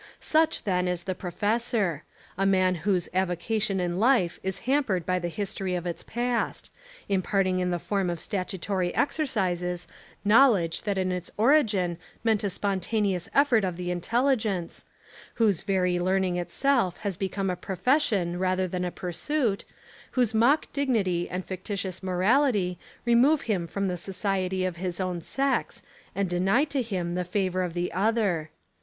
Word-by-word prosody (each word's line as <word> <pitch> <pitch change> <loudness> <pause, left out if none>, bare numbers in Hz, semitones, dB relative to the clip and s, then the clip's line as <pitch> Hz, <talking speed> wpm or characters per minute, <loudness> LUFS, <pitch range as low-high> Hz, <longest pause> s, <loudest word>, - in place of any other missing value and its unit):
Such 320 +1 +2
then 180 -2 0
is 180 -1 -1
the 185 - -2
professor; 205 - -1 0.3
a 195 - -1
man 185 -1 +3
whose 185 0 0
avo 185 -1 +1
cation 210 0 0
in 175 0 -1
life 225 -7 +3
is 190 -1 -3
hampered 250 - +1
by 185 0 +1
the 175 - -3
history 190 0 -3
of 175 0 -3
its 170 -1 -3
past: 240 0 -2 0.4
imparting 190 -1 +1
in 180 0 0
the 175 - 0
form 195 +1 -1
of 170 -1 -3
statutory 185 -1 -2
exer 310 +2 +1
cises 180 -6 -1 0.4
knowledge 210 -7 +4
that 200 -2 0
in 185 -1 0
its 180 -1 -4
origin 210 - +3 0.2
meant 220 -2 +2
a 200 - +1
spon 195 +1 -1
taneous 195 -3 -1
effort 275 -6 +4
of 180 -3 -2
the 180 0 -3
intelligence, 215 -1 0 0.5
whose 210 -6 +2
very 180 -2 +1
learning 185 0 +1
itself 195 +2 +1
has 200 -2 -1
become 195 +1 -2
a - - -2
profession 190 - 0
rather 185 0 +1
than 180 0 -3
a 180 - -1
pursuit, 200 - -1 0.5
whose 245 -4 +2
mock 240 +8 +4
dignity 210 -11 0
and 180 +1 -4
ficti 185 +2 -5
tious 190 -2 -3
morality 190 - +2 0.3
remove 250 +6 +4
him 190 -7 -1
from 200 +3 -2
the 180 -1 -2
society 190 0 -1
of 180 -2 -3
his 180 0 -3
own 180 -2 -2
sex 275 +8 -1 0.3
and 200 -1 0
deny 190 +9 +2
to 285 -3 -1
him 185 -7 -3
the 180 0 -1
favour 185 0 -1
of 180 -2 -3
the 175 0 -2
other. 195 -5 +1
190 Hz, 160 wpm, -27 LUFS, 180-220 Hz, 0.5 s, knowledge